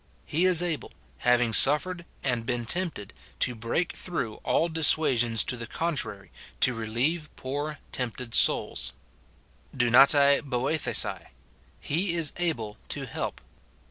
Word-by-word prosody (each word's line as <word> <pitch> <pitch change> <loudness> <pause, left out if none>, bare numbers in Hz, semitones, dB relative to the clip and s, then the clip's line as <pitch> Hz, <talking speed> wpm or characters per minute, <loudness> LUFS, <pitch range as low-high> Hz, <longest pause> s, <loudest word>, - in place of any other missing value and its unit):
He 170 +5 0
is 180 -2 +5
able, 170 -4 -3 0.3
having 120 -2 +2
suffered 170 +8 +4 0.2
and 125 -4 -1
been 120 0 -3
tempted, 165 - -1 0.3
to 125 - +1
break 120 +10 -2
through 130 -12 -4
all 165 - 0
dissuasions 135 -8 +2
to - - 0
the 115 -1 -7
contrary, 145 -11 -4 0.3
to 130 - +4
relieve 125 +9 -2
poor 145 +3 -4
tempted 125 -1 -4
souls: - - +2 0.8
(JuvaToti 140 +4 +5
/^orj^^cai, 140 +3 -1 0.2
— - - -34
" - - -32
He 170 +4 0
is 165 -4 +1
able 120 -12 -2
to - - -4
help." - - -5
140 Hz, 130 wpm, -27 LUFS, 120-160 Hz, 0.8 s, is